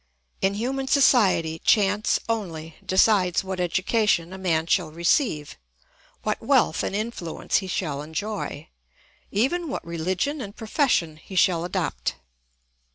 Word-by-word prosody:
In 195 Hz, +1 st, +1 dB
human 265 Hz, +5 st, -2 dB
society 200 Hz, -, +3 dB
chance 205 Hz, +1 st, +2 dB
only 165 Hz, -8 st, -4 dB
decides 190 Hz, -2 st, +3 dB
what 190 Hz, -1 st, -4 dB
education 185 Hz, 0 st, +1 dB
a -, -, -7 dB
man 165 Hz, -4 st, +1 dB
shall 170 Hz, -1 st, +1 dB
receive, 170 Hz, -, 0 dB, 0.6 s
what -, -, -1 dB
wealth 75 Hz, -, +2 dB
and -, -, -2 dB
influence 210 Hz, -6 st, -2 dB
he 190 Hz, -, -3 dB
shall 145 Hz, -5 st, -2 dB
enjoy, 160 Hz, -1 st, -5 dB, 0.6 s
even 305 Hz, -, 0 dB
what 270 Hz, -, -4 dB
religion 185 Hz, -, -2 dB
and 205 Hz, -2 st, -7 dB
profession 220 Hz, -, 0 dB
he 190 Hz, +4 st, -11 dB
shall 180 Hz, -2 st, +3 dB
adopt. 60 Hz, -, -2 dB
190 Hz, 125 wpm, -24 LUFS, 165-220 Hz, 0.6 s, society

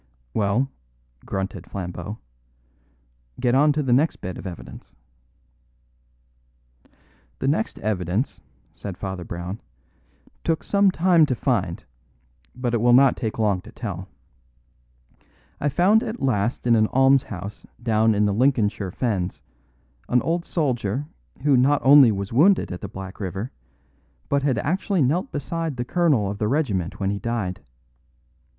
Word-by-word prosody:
"Well," 110 Hz, +6 st, +1 dB, 0.6 s
grunted 95 Hz, 0 st, -4 dB
Flambeau, 90 Hz, +2 st, -5 dB, 1.2 s
"get 120 Hz, -, +2 dB
on 145 Hz, +3 st, +5 dB
to 150 Hz, 0 st, 0 dB
the 125 Hz, -3 st, +2 dB
next 145 Hz, +6 st, +3 dB
bit 90 Hz, 0 st, -6 dB
of -, -, -7 dB
evidence." 80 Hz, -7 st, -10 dB, 2.4 s
"The -, -, -2 dB
next 160 Hz, +11 st, 0 dB
evidence," 100 Hz, -, -2 dB, 0.3 s
said 95 Hz, -3 st, -7 dB
Father 95 Hz, -2 st, -5 dB
Brown, 90 Hz, +4 st, -6 dB, 0.8 s
"took 165 Hz, -1 st, 0 dB
some 200 Hz, -1 st, +3 dB
time 175 Hz, -3 st, +4 dB
to 130 Hz, -, 0 dB
find, 100 Hz, -10 st, -1 dB, 0.7 s
but 125 Hz, -1 st, -2 dB
it 115 Hz, -, +1 dB
will 120 Hz, 0 st, +5 dB
not 135 Hz, +2 st, +6 dB
take 110 Hz, -4 st, -4 dB
long 105 Hz, -4 st, +1 dB
to -, -, -13 dB
tell. 95 Hz, -5 st, -6 dB, 1.5 s
I 145 Hz, -, +1 dB
found 190 Hz, +9 st, +4 dB
at 235 Hz, -1 st, -5 dB
last 120 Hz, -3 st, 0 dB
in 120 Hz, -1 st, +5 dB
an 110 Hz, -1 st, +3 dB
almshouse 130 Hz, -7 st, +1 dB, 0.2 s
down 110 Hz, -1 st, +3 dB
in 105 Hz, +1 st, +3 dB
the 100 Hz, -, +1 dB
Lincolnshire 110 Hz, -4 st, +1 dB
Fens 95 Hz, -3 st, -2 dB, 0.7 s
an 125 Hz, 0 st, +3 dB
old 170 Hz, +1 st, -1 dB
soldier 130 Hz, -, -1 dB, 0.4 s
who 145 Hz, -2 st, +4 dB
not 135 Hz, +3 st, +4 dB
only 135 Hz, -3 st, +8 dB
was 100 Hz, +1 st, -4 dB
wounded 180 Hz, +10 st, +4 dB
at 90 Hz, -, -6 dB
the 100 Hz, -, -6 dB
Black 95 Hz, -2 st, -8 dB
River, 95 Hz, +4 st, -4 dB, 0.8 s
but 140 Hz, -, +2 dB
had 135 Hz, -4 st, +1 dB
actually 180 Hz, -, 0 dB
knelt 155 Hz, +9 st, 0 dB
beside 165 Hz, 0 st, -3 dB
the 120 Hz, -, -2 dB
colonel 145 Hz, -, +2 dB
of 100 Hz, -, -7 dB
the 105 Hz, -, 0 dB
regiment 105 Hz, -, -1 dB
when 100 Hz, -1 st, 0 dB
he 100 Hz, -, -3 dB
died. 110 Hz, -6 st, -3 dB
120 Hz, 140 wpm, -23 LUFS, 100-145 Hz, 2.4 s, only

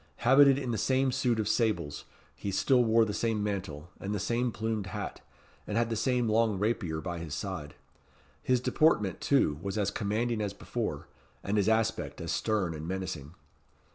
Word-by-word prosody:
Habited 135 Hz, +2 st, +7 dB
in 130 Hz, -3 st, -2 dB
the 110 Hz, -, -1 dB
same 130 Hz, 0 st, +2 dB
suit 125 Hz, -3 st, +1 dB
of 105 Hz, -, 0 dB
sables, 100 Hz, -, 0 dB, 0.3 s
he 100 Hz, -, -5 dB
still 125 Hz, +6 st, +3 dB
wore 115 Hz, 0 st, +4 dB
the 105 Hz, -, -3 dB
same 110 Hz, 0 st, 0 dB
mantle, 90 Hz, -6 st, -4 dB
and 100 Hz, +2 st, -3 dB
the -, -, -2 dB
same 120 Hz, +5 st, 0 dB
plumed 110 Hz, -3 st, -2 dB
hat, 90 Hz, -, -5 dB, 0.5 s
and 105 Hz, -, -1 dB
had 115 Hz, 0 st, +1 dB
the -, -, 0 dB
same 125 Hz, +1 st, +1 dB
long 110 Hz, -1 st, +2 dB
rapier 100 Hz, -6 st, -1 dB
by 85 Hz, -1 st, -4 dB
his 80 Hz, -3 st, -5 dB
side. 75 Hz, 0 st, -5 dB, 0.7 s
His 125 Hz, -1 st, +2 dB
deportment, 120 Hz, -, +2 dB
too, 80 Hz, -, +2 dB
was 100 Hz, +3 st, -3 dB
as 100 Hz, -1 st, +1 dB
commanding 110 Hz, +2 st, -1 dB
as 100 Hz, -1 st, -2 dB
before, -, -, -4 dB, 0.4 s
and 100 Hz, -, -1 dB
his 105 Hz, 0 st, +3 dB
aspect 110 Hz, 0 st, 0 dB
as -, -, -4 dB
stern 100 Hz, -6 st, 0 dB
and 80 Hz, +1 st, -6 dB
menacing. 90 Hz, -5 st, -5 dB
110 Hz, 180 wpm, -30 LUFS, 95-120 Hz, 0.7 s, Habited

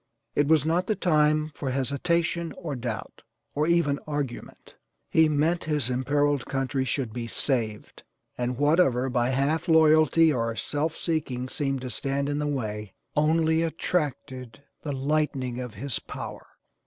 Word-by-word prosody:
It 145 Hz, -, +2 dB
was 155 Hz, -2 st, +4 dB
not 175 Hz, +3 st, +1 dB
the 215 Hz, -, +1 dB
time 155 Hz, -4 st, +2 dB
for 140 Hz, -, -4 dB
hesitation, 165 Hz, +6 st, 0 dB
or 155 Hz, -6 st, -4 dB
doubt, 120 Hz, -4 st, -5 dB, 0.3 s
or 150 Hz, +2 st, 0 dB
even 170 Hz, -5 st, +2 dB
argument. 145 Hz, -5 st, -5 dB, 0.4 s
He 160 Hz, -1 st, +5 dB
meant 155 Hz, +4 st, +1 dB
his 150 Hz, -5 st, 0 dB
imperiled 140 Hz, +2 st, +1 dB
country 135 Hz, -1 st, -1 dB
should 125 Hz, -3 st, -2 dB
be 120 Hz, -1 st, -4 dB
saved, 115 Hz, -3 st, -2 dB, 0.3 s
and 125 Hz, 0 st, -2 dB
whatever 145 Hz, -4 st, +3 dB
by 120 Hz, -1 st, +1 dB
half 145 Hz, +6 st, 0 dB
loyalty 160 Hz, 0 st, +5 dB
or 115 Hz, -2 st, -1 dB
self 150 Hz, +8 st, -2 dB
seeking 140 Hz, -7 st, -2 dB
seemed 135 Hz, -2 st, -2 dB
to 125 Hz, -1 st, -5 dB
stand 140 Hz, +2 st, -1 dB
in 145 Hz, 0 st, -1 dB
the 150 Hz, -, -1 dB
way 105 Hz, -7 st, -3 dB, 0.2 s
only 160 Hz, +1 st, +3 dB
attracted 140 Hz, -7 st, -3 dB, 0.2 s
the 150 Hz, -, -4 dB
lightning 135 Hz, -3 st, -1 dB
of 125 Hz, -3 st, -6 dB
his 130 Hz, +4 st, -3 dB
power. -, -, -8 dB
145 Hz, 145 wpm, -26 LUFS, 130-155 Hz, 0.4 s, He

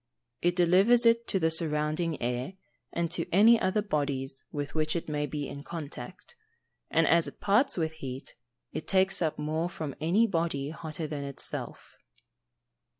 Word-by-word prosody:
_ -, -, -55 dB, 0.4 s
It 175 Hz, 0 st, +2 dB
delivers 190 Hz, +7 st, +5 dB
it 230 Hz, 0 st, +4 dB
to 190 Hz, -, +1 dB
the 160 Hz, -1 st, +2 dB
surrounding 155 Hz, 0 st, +1 dB
air, 125 Hz, +7 st, -2 dB, 0.4 s
and 170 Hz, -1 st, -1 dB
to 170 Hz, -1 st, -1 dB
any 220 Hz, +5 st, +6 dB
other 205 Hz, +3 st, +1 dB
bodies 140 Hz, -7 st, -2 dB
with 145 Hz, -1 st, -4 dB
which 155 Hz, 0 st, 0 dB
it 170 Hz, -, -3 dB
may 150 Hz, -1 st, -1 dB
be 145 Hz, 0 st, -4 dB
in 140 Hz, -, -7 dB
contact 160 Hz, -, -8 dB, 0.5 s
and 165 Hz, -, +3 dB
as 170 Hz, 0 st, +4 dB
it -, -, -10 dB
parts 215 Hz, +6 st, +2 dB
with 160 Hz, -2 st, 0 dB
heat, 135 Hz, -4 st, -7 dB, 0.4 s
it -, -, -5 dB
takes 190 Hz, 0 st, +2 dB
up 160 Hz, -3 st, 0 dB
more 155 Hz, +3 st, -1 dB
from 155 Hz, -5 st, -5 dB
any 185 Hz, +9 st, +3 dB
body 165 Hz, -7 st, -1 dB
hotter 160 Hz, 0 st, -6 dB
than 145 Hz, -2 st, -4 dB
itself. 140 Hz, -1 st, -6 dB
160 Hz, 165 wpm, -29 LUFS, 150-180 Hz, 0.5 s, any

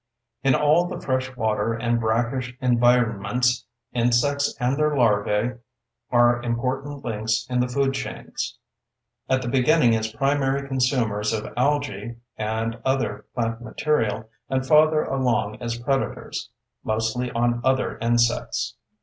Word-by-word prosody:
In 135 Hz, -2 st, +4 dB
all 155 Hz, +4 st, +3 dB
the 175 Hz, -1 st, -5 dB
fresh 130 Hz, -1 st, -2 dB
water 110 Hz, 0 st, 0 dB
and 120 Hz, 0 st, 0 dB
brackish 120 Hz, +3 st, -1 dB
environments, 120 Hz, 0 st, +2 dB, 0.3 s
insects 125 Hz, +4 st, +2 dB
and 125 Hz, +1 st, +1 dB
their 150 Hz, 0 st, +1 dB
larvae 110 Hz, +1 st, +1 dB, 0.5 s
are 120 Hz, 0 st, +4 dB
important 130 Hz, +4 st, -3 dB
links 110 Hz, -1 st, -1 dB
in 125 Hz, -, +1 dB
the 125 Hz, -, +2 dB
food 135 Hz, +2 st, 0 dB
chains—at 130 Hz, -1 st, -6 dB
the -, -, -4 dB
beginning 130 Hz, 0 st, +4 dB
as 110 Hz, 0 st, -2 dB
primary 135 Hz, +2 st, 0 dB
consumers 125 Hz, -6 st, 0 dB
of 110 Hz, -1 st, -4 dB
algae 140 Hz, -2 st, -1 dB, 0.2 s
and 110 Hz, +1 st, -2 dB
other 130 Hz, 0 st, -1 dB
plant 115 Hz, -1 st, -2 dB
material, 110 Hz, -3 st, -1 dB, 0.2 s
and 130 Hz, 0 st, 0 dB
farther 155 Hz, +2 st, +5 dB
along 125 Hz, -5 st, 0 dB
as 115 Hz, -1 st, -3 dB
predators, 135 Hz, +3 st, -2 dB, 0.3 s
mostly 110 Hz, +3 st, -1 dB
on 120 Hz, 0 st, +1 dB
other 130 Hz, 0 st, +1 dB
insects. 120 Hz, 0 st, 0 dB
125 Hz, 125 wpm, -24 LUFS, 115-135 Hz, 0.5 s, farther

